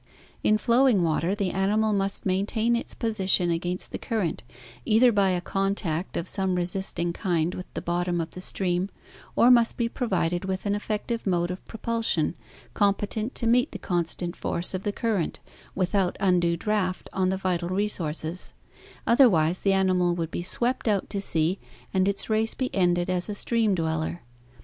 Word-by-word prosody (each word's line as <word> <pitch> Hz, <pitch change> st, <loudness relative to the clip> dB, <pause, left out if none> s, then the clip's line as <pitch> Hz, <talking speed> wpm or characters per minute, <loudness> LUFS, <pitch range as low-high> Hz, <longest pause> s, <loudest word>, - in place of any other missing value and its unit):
In 215 Hz, -, +4 dB
flowing 235 Hz, -3 st, +3 dB
water, 165 Hz, +3 st, +1 dB
the 200 Hz, -3 st, -1 dB
animal 210 Hz, +3 st, +1 dB
must 195 Hz, 0 st, -1 dB
maintain 215 Hz, +5 st, +1 dB
its 235 Hz, -, -4 dB
posi 215 Hz, -5 st, -2 dB
tion 175 Hz, -2 st, +4 dB
against 175 Hz, +2 st, -3 dB
the -, -, -5 dB
current 215 Hz, -9 st, -2 dB, 0.4 s
either 235 Hz, -, +5 dB
by 200 Hz, -3 st, +3 dB
a 180 Hz, -1 st, 0 dB
contact 195 Hz, -3 st, -1 dB
of 170 Hz, -, -3 dB
some 190 Hz, -2 st, 0 dB
resisting 175 Hz, -1 st, -1 dB
kind 175 Hz, -2 st, 0 dB
with 180 Hz, -, -8 dB
the -, -, -4 dB
bottom 175 Hz, 0 st, 0 dB
of 165 Hz, -1 st, -3 dB
the 180 Hz, -, -9 dB
stream, 185 Hz, 0 st, -1 dB, 0.5 s
or 245 Hz, -, +6 dB
must 235 Hz, -2 st, +4 dB
be 235 Hz, -, +1 dB
provided 180 Hz, -8 st, -1 dB
with 190 Hz, +1 st, -3 dB
an 200 Hz, -, +1 dB
effec 210 Hz, 0 st, -2 dB
tive 230 Hz, -3 st, -3 dB
mode 175 Hz, -1 st, +1 dB
of 180 Hz, -, -7 dB
propulsion 225 Hz, -8 st, -1 dB, 0.4 s
competent 205 Hz, +4 st, 0 dB
to 235 Hz, -, -3 dB
meet 245 Hz, +4 st, +3 dB
the -, -, -4 dB
constant 175 Hz, 0 st, -2 dB
force 170 Hz, +2 st, +1 dB
of 185 Hz, -, -2 dB
the 205 Hz, -, -1 dB
current 205 Hz, -5 st, -1 dB, 0.4 s
without 190 Hz, 0 st, +1 dB
undue 175 Hz, -3 st, +2 dB
draft 190 Hz, -2 st, -1 dB
on 185 Hz, -1 st, +1 dB
the 190 Hz, -, 0 dB
vital 180 Hz, -2 st, -1 dB
resources; 180 Hz, -4 st, -3 dB, 0.5 s
otherwise 185 Hz, -, +4 dB
the 195 Hz, -, +2 dB
animal 185 Hz, -2 st, +2 dB
would 165 Hz, -2 st, -3 dB
be -, -, -3 dB
swept 240 Hz, +8 st, -1 dB
out 205 Hz, -3 st, 0 dB
to 200 Hz, -, -2 dB
sea 170 Hz, +1 st, 0 dB, 0.3 s
and 190 Hz, 0 st, +2 dB
its 200 Hz, 0 st, -1 dB
race 220 Hz, 0 st, 0 dB
be 255 Hz, -1 st, -2 dB
ended 175 Hz, -2 st, +2 dB
as 180 Hz, +1 st, -1 dB
a 205 Hz, -, -3 dB
stream 225 Hz, -2 st, +1 dB
dweller. 160 Hz, 0 st, -2 dB
190 Hz, 175 wpm, -26 LUFS, 175-215 Hz, 0.5 s, or